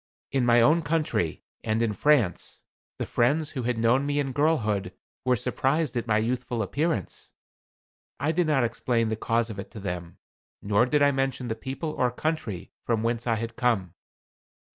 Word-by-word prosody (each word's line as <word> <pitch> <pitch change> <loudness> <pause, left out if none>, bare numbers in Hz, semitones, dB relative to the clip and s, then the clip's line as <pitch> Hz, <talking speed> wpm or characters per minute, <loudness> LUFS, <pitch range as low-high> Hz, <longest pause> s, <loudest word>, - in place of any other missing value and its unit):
In 130 -3 +1
my 120 0 +6
own 155 +8 +5
country 150 - -1 0.2
and 110 0 +1
in 110 -2 0
France, 130 -6 +1 0.4
the - - -2
friends 145 +6 +1
who 130 - -3
had 120 0 -1
known 115 +4 +3
me 145 0 0
in 140 -2 0
girlhood 110 - +1 0.3
were 125 0 +4
surprised 135 +5 0
at 120 0 -2
my 110 -1 +3
youthful 120 +1 -1
appearance. 155 - -2 0.9
I 145 +4 +1
did 170 0 +1
not 140 -5 +3
explain 115 -1 0
the 110 - 0
cause 115 +1 0
of 100 - -7
it 100 - -7
to 110 - -9
them, 90 -3 -5 0.4
nor 105 +4 +2
did 145 +2 +3
I 145 - +5
mention 135 -2 -1
the 110 - -1
people 135 +7 -4
or 125 -4 +1
country 125 - -3
from 115 -2 0
whence 115 +1 -1
I 115 - +3
had 115 +1 -4
come. 100 -8 0
120 Hz, 180 wpm, -26 LUFS, 110-145 Hz, 0.9 s, my